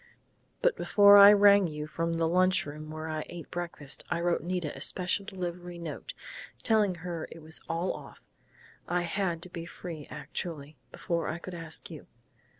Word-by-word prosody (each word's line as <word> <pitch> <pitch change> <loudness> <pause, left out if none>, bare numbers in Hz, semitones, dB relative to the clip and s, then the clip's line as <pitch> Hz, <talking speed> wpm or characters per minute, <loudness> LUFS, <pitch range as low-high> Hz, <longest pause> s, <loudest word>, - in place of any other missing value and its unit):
But - - +4
before 205 -1 +6
I 200 0 +11
rang 200 -2 +6
you 150 -1 -5
from 165 +3 -2
the 165 0 +1
lunch 185 +2 +3
room 150 +1 -8
where 155 0 -6
I 155 -1 -3
ate 170 -4 -9
breakfast 170 -5 -5
I 175 - 0
wrote 170 0 +1
Nita 175 -2 -3
a - - -9
special 190 +2 0
delivery 175 -2 -5
note, 165 -3 -7 0.5
telling 215 -5 +3
her 170 -3 -4
it 165 - -11
was 160 0 -6
all 170 +3 -1
off. - - -12 0.6
I 175 0 0
had 175 -1 -1
to 180 - -4
be 170 -1 -6
free 165 -4 -8
actually, 150 0 -6 0.2
before 170 -1 -2
I 160 - -2
could 180 +1 -9
ask 165 0 -5
you.... 155 - -10
170 Hz, 175 wpm, -29 LUFS, 160-185 Hz, 0.6 s, I